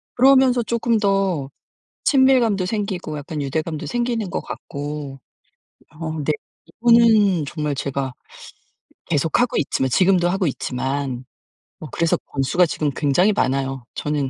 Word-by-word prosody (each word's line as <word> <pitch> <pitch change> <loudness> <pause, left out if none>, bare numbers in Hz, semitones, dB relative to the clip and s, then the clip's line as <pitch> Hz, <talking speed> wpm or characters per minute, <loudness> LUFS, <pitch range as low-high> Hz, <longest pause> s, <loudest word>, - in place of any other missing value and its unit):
그러면서 260 -1 +5
쪼끔 235 0 0
더 195 -8 0 0.6
친밀감도 250 -9 +3
생기고 185 -7 -3
약간 150 +1 -5
유대감도 155 +2 -3
생기는 235 0 -2
거 - - -2
같고 145 -1 -7 0.8
어 160 -1 -4
네 155 - +1 0.3
이거는 225 -8 +4
정말 150 -1 -3
제가 135 -1 -3 0.9
계속하고 165 - +1
있지만 130 -1 0
지금도 180 +4 +3
하고 190 0 0
있지만 130 -1 -3 0.6
어 155 - -8
그래서 165 -1 +1
권수가 140 +6 +2
지금 155 -2 -1
굉장히 170 +8 +3
많아요. 135 -5 -1
저는 145 -3 -2
165 Hz, 280 characters per minute, -21 LUFS, 140-210 Hz, 0.9 s, 그러면서